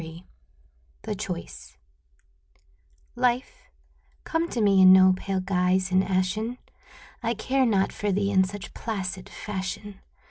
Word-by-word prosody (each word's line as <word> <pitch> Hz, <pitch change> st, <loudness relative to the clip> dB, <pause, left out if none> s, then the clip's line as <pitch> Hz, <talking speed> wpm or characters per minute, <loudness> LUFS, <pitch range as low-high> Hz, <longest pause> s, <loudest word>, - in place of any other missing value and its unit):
103 165 Hz, +2 st, -10 dB, 0.8 s
THE 215 Hz, -, -3 dB
CHOICE 190 Hz, -4 st, -7 dB, 1.4 s
Life, 250 Hz, +1 st, -1 dB, 0.5 s
come 330 Hz, +1 st, -1 dB
to 240 Hz, -, -3 dB
me 200 Hz, -3 st, +4 dB
in 185 Hz, 0 st, +9 dB
no 185 Hz, 0 st, +7 dB
pale 190 Hz, 0 st, -3 dB
guise 185 Hz, 0 st, +1 dB
and 185 Hz, +1 st, +3 dB
ashen, 195 Hz, +6 st, -1 dB, 0.6 s
I 230 Hz, 0 st, -1 dB
care 260 Hz, +4 st, +1 dB
not 195 Hz, -4 st, +1 dB
for 205 Hz, -1 st, -2 dB
thee 200 Hz, +1 st, 0 dB
in 190 Hz, -1 st, +4 dB
such 195 Hz, +1 st, -7 dB
placid 195 Hz, -3 st, -5 dB
fashion! 200 Hz, 0 st, -6 dB
195 Hz, 130 wpm, -26 LUFS, 185-220 Hz, 1.4 s, in